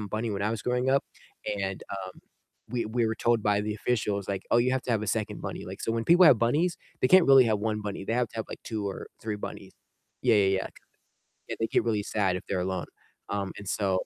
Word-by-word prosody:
bunny 110 +2 -3
when 100 -1 -2
I 105 - +1
was 110 -2 -3
growing 125 +2 0
up 135 +1 +3 0.5
and, 95 -1 -3
um, 95 -1 -6 0.5
we 120 0 -1
we 115 +1 0
were 110 - -1
told 115 0 +2
by 105 -1 +2
the 105 0 -2
officials, 105 -3 -1
like, 95 -1 -2
"Oh, - - +6
you 125 +2 +2
have 130 -1 0
to - - -4
have 110 - +1
a 110 - -3
2nd 105 0 -2
bunny." - - -5
Like, - - -8
so - - -1
when 115 0 -1
people 175 +5 +6
have 125 - +7
bunnies, 150 +10 +1 0.2
they 130 - +3
can't 185 +2 +7
really 135 -2 +8
have 110 -2 +1
1 105 0 -1
bunny, 100 -2 -5
they 110 - -2
have 120 -2 +1
to - - -12
have, 110 - -3
like, - - -8
2 110 -3 -3
or 95 - -7
3 110 -1 -3
bunnies, 105 - -8 0.5
yeah, 120 -3 +4
yeah, 100 -2 +4
yeah, 95 0 +2
yeah. - - -5 0.8
Yeah, - - -2
they 115 - +1
get - - +2
really 110 -3 0
sad 100 -3 0
if - - -9
they're 95 -2 -1
alone, 90 -3 -2 0.4
um, 100 -1 -2
and 100 - -9
so 95 -3 0
110 Hz, 255 wpm, -28 LUFS, 100-120 Hz, 0.8 s, really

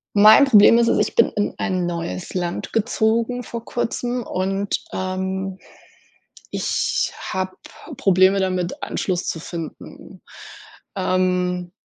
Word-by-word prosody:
Mein 215 +7 +8
Problem 230 -3 +7
ist 235 0 +3
es: - - +2
Ich - - -7
bin 230 - +4
in 205 - -1
ein 185 -2 -1
neues 175 +1 -4
Land 175 -2 -3
gezogen 230 +2 0
vor 230 0 -7
Kurzem 245 +1 -2
und, 195 +1 -2
ähm, 190 0 -3 0.9
ich - - -1
habe 185 0 -4 0.4
Probleme 190 +1 +4
damit, 185 -2 -2
Anschluss 180 -2 -2
zu 165 - -3
finden. 165 0 -9 0.7
Ähm 180 -1 0
190 Hz, 115 wpm, -21 LUFS, 180-220 Hz, 0.9 s, Mein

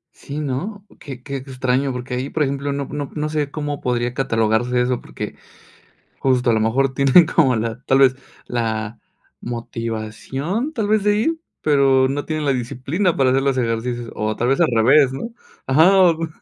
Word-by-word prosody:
Sí, 140 +2 -7
¿no? 155 +9 -4
Qué 130 -4 -9
qué 140 0 -4
extraño. 130 0 -1
Porque 125 0 -6
ahí, 130 +3 -2
por 155 - 0
ejemplo, 140 0 -2
no 140 0 -3
no 145 0 -5
no 150 0 -2
sé 150 -2 -1
cómo 145 -1 -4
podría 120 -1 -1
catalogarse 120 -1 +1
eso, 125 0 -1
porque - - -7 0.8
justo 130 -2 +2
a - - +4
lo 110 - +2
mejor 130 +5 +1
tienen 140 +6 +6
como 135 -7 +3
la 115 +1 -3
tal 135 0 +2
vez, 130 -1 +5 0.3
¿la 110 -2 -3 0.4
motivación 120 - -4
tal 220 -7 -1
vez 215 -1 +2
de 205 0 +3
ir? 320 +10 0 0.2
Pero 135 -3 +3
no 140 +2 -3
tienen 155 -1 -3
la 140 - +2
disciplina 135 - -1
para 135 -2 +3
hacer 135 +1 +2
los 135 -1 +1
ejercicios. 120 0 -2
O 110 0 -2
tal 120 - -1
vez 135 +1 +2
al 170 - +4
revés, 130 +4 +4
¿no? 135 +12 -5 0.4
Ajá. 160 +8 +5
O 170 -3 +4
135 Hz, 185 wpm, -20 LUFS, 120-150 Hz, 0.8 s, tienen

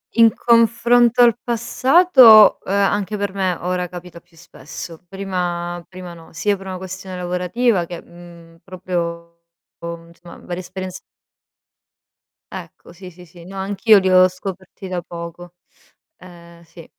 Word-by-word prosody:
In 230 -1 +5
confronto 235 +1 +3
al 235 -2 +5
passato, 245 - +5
uhm, 195 - -3
anche 200 +1 0
per 200 -2 -3
me 190 -3 -1
ora 180 0 -2
capita 175 -1 -11
più 170 0 -29
spesso. 165 0 -11
Prima 175 -2 -4
prima 180 -2 -10
no, 165 -1 -16
sia 200 +5 -1
per 195 - -13
una 190 -1 -6
questione 185 0 -8
lavorativa 180 +3 -1
che, 175 0 -8
uhm, 170 -1 -16
proprio 170 -2 -5 0.5
insomma 170 +1 -10
varie 175 0 -7
esperienz 185 +1 -8 1.5
Ecco, - - -11
sì, 180 +1 -12
sì, 180 +1 -16
sì. 170 0 -16
No, 195 +2 -11
anch'io 200 +3 +3
li 190 - 0
ho 185 0 +6
scoperti 185 +1 -9
da 180 -1 -3
poco. 170 +1 -10 0.6
Ehm, 170 -1 -16
sì. 165 0 -15
185 Hz, 140 wpm, -19 LUFS, 175-200 Hz, 1.5 s, ho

